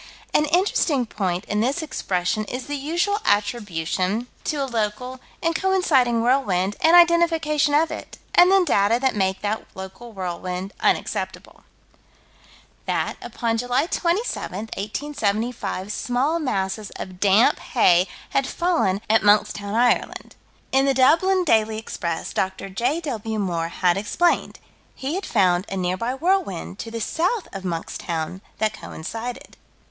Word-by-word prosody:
An 300 - +4
interesting 315 -6 +2
point 190 -4 -2
in 210 0 -1
this 275 +8 0
expression 190 - -1
is 250 +4 -5
the 290 - -5
usual 345 +9 0
attribution 205 0 0 0.2
to 310 - -1
a - - 0
local 235 +1 -3 0.2
and 330 0 +1
coinciding 285 -12 +2
whirlwind, 205 -7 +1
and 325 +2 +6
identification 330 -4 +4
of 320 +2 +3
it - - -8 0.2
and 355 +1 +7
then 385 -2 +5
data 205 -4 +3
that 265 -2 +1
make 190 -2 0
that 210 +1 -2
local 190 +5 -9
whirlwind 185 0 -5
unacceptable - - -2 1.2
That, - - -1
upon 230 -2 -2
July 245 +4 +1
27, 340 - -2
1875, 215 -3 -2
small 260 +9 0
masses 205 -6 -2
of 185 -1 -8
damp 205 +4 +4
hay 180 -6 +3 0.2
had 275 -1 +1
fallen 330 - 0
at 220 +1 +4
Monkstown, 205 0 +2
Ireland. 245 +1 +1 0.4
In 270 +1 +3
the 275 -1 +2
Dublin 335 +9 +4
Daily 220 -8 +2
Express, 170 -6 -4
Dr. 190 +1 -2
J.W. 235 - -2
Moore 170 -5 -1
had 175 +1 +1
explained: 335 - 0 0.4
he 270 +3 -4
had 380 +1 -3
found 185 -3 +2
a 195 - -3
nearby 185 +7 -1
whirlwind, 320 - -1
to 230 - -5
the 230 0 -5
south 360 - -1
of 195 -1 -6
Monkstown, 170 0 -4 0.2
that 215 0 0
coincided. 225 +6 -7
230 Hz, 135 wpm, -23 LUFS, 195-295 Hz, 1.2 s, and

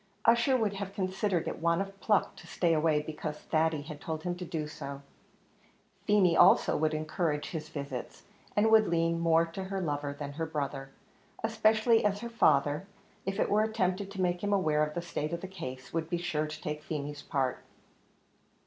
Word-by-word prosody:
Ussher 235 +3 +5
would 215 -4 0
have 195 0 -5
considered 185 -2 -1
it - - -4
want 170 +1 +2
of 195 0 -5
pluck 210 -3 +1
to - - -12
stay 170 -2 +1
away 155 -1 +2
because 150 -1 -5
Thady 155 -1 0
had 150 -1 -9
told 160 -1 -4
him 180 -1 -1
to 180 - -6
do 160 -3 -3
so; 140 -2 -7 1.0
Feemy 195 -5 +4
also - - +6
would 155 0 +1
encourage 155 -1 -1
his 155 -2 -5
visits, 140 -5 -6 0.3
and 220 +2 +3
would 220 -1 +6
lean 165 0 +1
more 165 0 +4
to 180 +3 -6
her 195 0 -3
lover 145 -4 -2
than 145 0 -6
her 160 +3 -3
brother 140 -3 -3 0.5
especially 225 +1 +3
as 205 0 +1
her 235 - -5
father, 150 -5 +3 0.4
if 195 0 -2
it - - +2
were 210 +1 +4
attempted 200 -3 0
to 195 -1 -5
make 175 0 0
him 205 - 0
aware 155 -6 +2
of 150 0 -3
the 175 - -2
state 155 -2 -3
of 170 - -3
the 190 - -5
case, 130 -9 -8
would 165 -1 -2
be 175 - 0
sure 155 -3 -1
to 150 - -8
take 150 0 -3
Feemy's 145 -1 -5
part. 135 -2 -1
165 Hz, 195 wpm, -30 LUFS, 150-195 Hz, 1.0 s, also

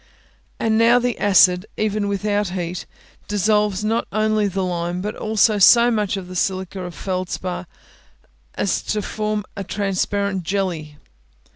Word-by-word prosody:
And 220 0 +1
now 235 +2 +6
the 245 -1 -1
acid, 190 -2 +4
even 215 -1 0
without 205 +1 0
heat, 175 -1 -4 0.4
dissolves 210 0 +1
not 225 +2 0
only 215 0 +1
the 190 0 -2
lime, 175 0 -2
but 210 +3 -4
also 215 -1 +2
so 235 +4 +7
much 210 -3 0
of 185 -2 -7
the 185 - -9
silica 190 +1 -2
of 180 -1 -6
the - - -15
feldspar 185 -1 -3 0.9
as - - 0
to 210 -1 -2
form 210 0 -2
a 200 - -4
transparent 200 0 -1
jelly. 170 -5 -3
200 Hz, 145 wpm, -21 LUFS, 185-215 Hz, 0.9 s, so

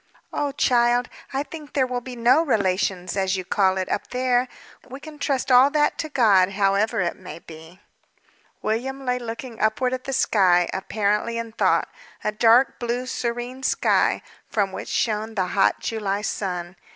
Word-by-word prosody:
"Oh, 290 -1 -1
child! 245 -2 +2 0.2
I 275 +1 -1
think 300 -1 -11
there 270 -3 +2
will 250 -1 -3
be 250 0 -8
no 245 +6 +4
relations, 190 - 0
as 190 -1 0
you 185 - -5
call 190 -1 +2
it, 185 - -2
up - - -2
there. 250 0 +1 0.4
We 265 +2 -8
can 300 0 -11
trust 275 -2 -1
all 255 +2 +7
that 295 0 +1
to 310 - -3
God, 200 -8 +4
however 195 +1 +1
it 175 - -1
may - - -10
be." 160 +2 -13 0.8
William 265 +5 -2
lay 250 0 0
looking 230 0 -7
upward 250 +4 +1
at 255 0 -4
the 270 - -3
sky, 180 -8 +3
apparently 210 +3 -1
in 230 -1 -5
thought, - - +1 0.4
a 215 - 0
dark 230 +4 +4
blue, 240 +1 -2
serene 245 +1 -4
sky, - - +1 0.3
from 200 -3 0
which - - -7
shone 220 0 -1
the 190 -3 +1
hot 195 - +2
July 205 -2 -2
sun. 180 -4 -4
230 Hz, 170 wpm, -23 LUFS, 195-255 Hz, 0.8 s, all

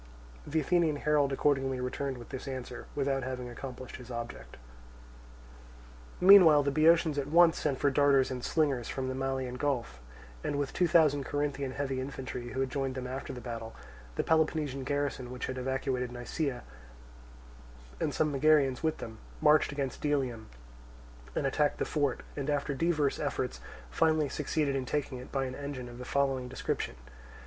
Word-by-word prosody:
The 160 +2 +1
Athenian 165 0 +2
herald 145 -1 +2
accordingly 135 -2 +1
returned 130 +1 -3
with 120 - -11
this 130 +1 -6
answer, 130 -2 -6
without 135 -1 0
having 130 -1 -4
accomplished 130 +1 -8
his 125 -1 -12
object. 120 - -7 1.6
Meanwhile 180 -6 +8
the 140 - +1
Boeotians 155 0 +4
at 140 - -2
once 165 +2 +5
sent 140 -3 0
for 140 +1 +2
darters 140 -1 +4
and 125 -1 -4
slingers 140 -7 +1
from 130 -1 -3
the - - -2
Malian 130 -1 -2
Gulf, 120 - -2 0.4
and 145 - -1
with 145 -1 -2
two 180 - +2
thousand 155 -5 +4
Corinthian 140 -2 -2
heavy 135 -2 -2
infantry 130 -2 -5
who 130 - -2
had 135 -1 -1
joined 135 -1 -2
them 130 -1 -4
after 130 +2 -5
the 125 - -7
battle, 115 -2 -6 0.4
the - - 0
Peloponnesian 155 -4 +1
garrison 140 -3 -2
which 125 0 -4
had 130 0 -4
evacuated 130 -1 -1
Nisaea, 125 +1 -3 1.4
and - - 0
some 155 -1 +1
Megarians 140 -2 +3
with 160 -1 0
them, 110 -1 -8 0.2
marched 150 0 +4
against 140 -2 -3
Delium, 130 -7 -1 0.9
and - - 0
attacked 145 +2 +1
the - - -1
fort, 145 -4 0
and 140 0 -3
after 145 0 0
divers 155 -1 +1
efforts 65 -1 -2 0.3
finally 155 - +2
succeeded 145 0 -1
in 130 -2 -2
taking 140 -3 -2
it 125 - -11
by 135 -1 0
an 130 - -5
engine 140 -2 -6
of 120 0 -10
the 125 - -6
following 135 -2 0
description. 125 - -3
135 Hz, 165 wpm, -30 LUFS, 130-145 Hz, 1.6 s, Meanwhile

